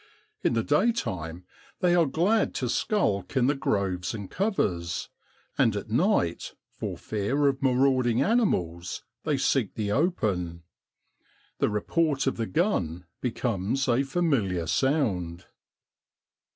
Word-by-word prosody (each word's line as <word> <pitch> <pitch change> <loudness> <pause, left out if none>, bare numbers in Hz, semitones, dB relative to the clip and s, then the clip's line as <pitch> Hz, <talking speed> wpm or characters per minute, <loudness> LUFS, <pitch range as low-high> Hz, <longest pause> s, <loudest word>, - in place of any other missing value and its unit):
In - - +2
the 115 -1 +1
daytime 100 - 0 0.3
they 180 -2 +3
are 170 -3 +4
glad 190 +10 +1
to 125 - -1
skulk 115 - 0
in 125 - +4
the 140 - +3
groves 95 -8 -1
and 100 -3 -7
covers, 90 - -1 0.5
and 110 - +4
at 105 +1 -5
night, 125 - +1 0.2
for - - -5
fear 110 +8 -1
of 135 -1 +1
marauding 130 -2 +3
animals, 90 - 0 0.2
they 150 -3 +1
seek 130 -5 +1
the 105 -2 -2
open. 100 - 0 1.0
The - - +2
report 140 +6 0
of 135 - 0
the 115 -1 -2
gun 90 - 0 0.2
becomes 120 +1 -1
a 120 +1 +3
familiar 135 - 0
sound. 90 - 0
120 Hz, 125 wpm, -27 LUFS, 95-150 Hz, 1.0 s, are